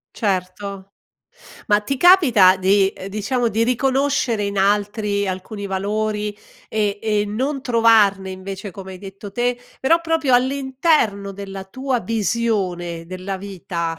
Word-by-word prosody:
Certo. 195 0 -3 0.8
Ma 205 0 +4
ti 270 +6 -3
capita 255 - +6
di 195 +1 +3
uhm, 185 - -8
diciamo 215 +5 -1
di 225 +1 0
riconoscere 260 -3 +1
in 200 0 -2
altri 205 +1 +1
alcuni 200 +2 -5
valori 210 +2 -2 0.3
e 210 -2 -1
e 210 -1 +1
non 260 +7 -2
trovarne, 220 -6 +3
invece, 190 +2 -7
come 190 +1 -9
hai 185 - -9
detto 195 +1 -9
te, 245 +2 0 0.2
però 330 +6 +3
proprio 325 -5 +1
all'interno 260 -5 +1
della 195 -1 -7
tua 260 +5 -2
visione 195 -7 -1
della 185 +2 -5
vita. 175 -4 -5
205 Hz, 130 wpm, -20 LUFS, 195-240 Hz, 0.8 s, capita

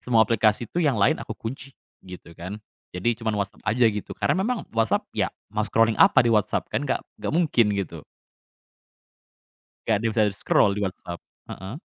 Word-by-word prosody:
semua 115 -3 +3
aplikasi 110 +1 +2
itu 175 - -3
yang 145 -8 +2
lain 100 - +2
aku - - -6
kunci, 125 +4 -6 0.3
gitu 90 -2 -12
kan. 90 +5 -7 0.4
Jadi 120 +6 +1
cuman 110 -2 -1
WhatsApp 100 -1 -4
aja 120 +3 +3
gitu, 105 - -6
karena 185 - +1
memang 235 +2 -1
WhatsApp 115 -1 +1
ya - - 0 0.2
mau 105 - -1
scrolling 115 -2 +2
apa - - +6
di 115 - +3
WhatsApp? 105 -2 +1
Kan - - -1
nggak - - 0 0.2
nggak - - -3
mungkin 150 -10 +3
gitu. 85 -5 -5 1.8
Nggak 110 - +2
ada - - -8
yang 110 - -2
bisa 110 - +4
scroll 100 0 +2
di - - -3
WhatsApp. 90 -2 -5 0.3
Heeh? 95 +6 -7
110 Hz, 180 wpm, -24 LUFS, 100-120 Hz, 1.8 s, apa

